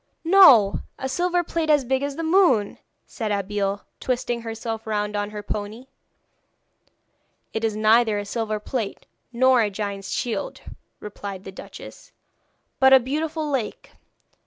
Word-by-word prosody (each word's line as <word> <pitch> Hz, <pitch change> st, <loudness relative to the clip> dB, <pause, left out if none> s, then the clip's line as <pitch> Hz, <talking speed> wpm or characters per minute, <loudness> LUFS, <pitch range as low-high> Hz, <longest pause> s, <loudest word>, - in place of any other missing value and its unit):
'No; 320 Hz, -, +7 dB, 0.2 s
a 265 Hz, -, -4 dB
silver 355 Hz, +5 st, 0 dB
plate 330 Hz, -1 st, -2 dB
as 295 Hz, -3 st, +4 dB
big 265 Hz, +2 st, 0 dB
as 280 Hz, 0 st, -3 dB
the 330 Hz, -, -4 dB
moon!' 320 Hz, -, +3 dB, 0.3 s
said 220 Hz, -4 st, -4 dB
Abeille, 200 Hz, 0 st, -2 dB
twisting 240 Hz, -2 st, -2 dB
herself 225 Hz, 0 st, -5 dB
round 210 Hz, -1 st, -2 dB
on 205 Hz, 0 st, -2 dB
her 210 Hz, -1 st, -7 dB
pony. 210 Hz, +4 st, -5 dB, 1.7 s
'It 220 Hz, -, -3 dB
is 220 Hz, -2 st, 0 dB
neither 220 Hz, 0 st, +3 dB
a 205 Hz, -, -4 dB
silver 215 Hz, 0 st, -3 dB
plate 220 Hz, -1 st, -4 dB, 0.3 s
nor 255 Hz, 0 st, +4 dB
a 210 Hz, -, +1 dB
giant's 200 Hz, -1 st, -5 dB
shield,' 225 Hz, -5 st, -3 dB, 0.4 s
replied 200 Hz, -2 st, -8 dB
the 195 Hz, -, -8 dB
duchess; 190 Hz, -, -12 dB, 0.7 s
'but 265 Hz, 0 st, +6 dB
a 265 Hz, -, +9 dB
beautiful 305 Hz, +4 st, -3 dB
lake. 265 Hz, -7 st, -4 dB
225 Hz, 140 wpm, -23 LUFS, 205-265 Hz, 1.7 s, a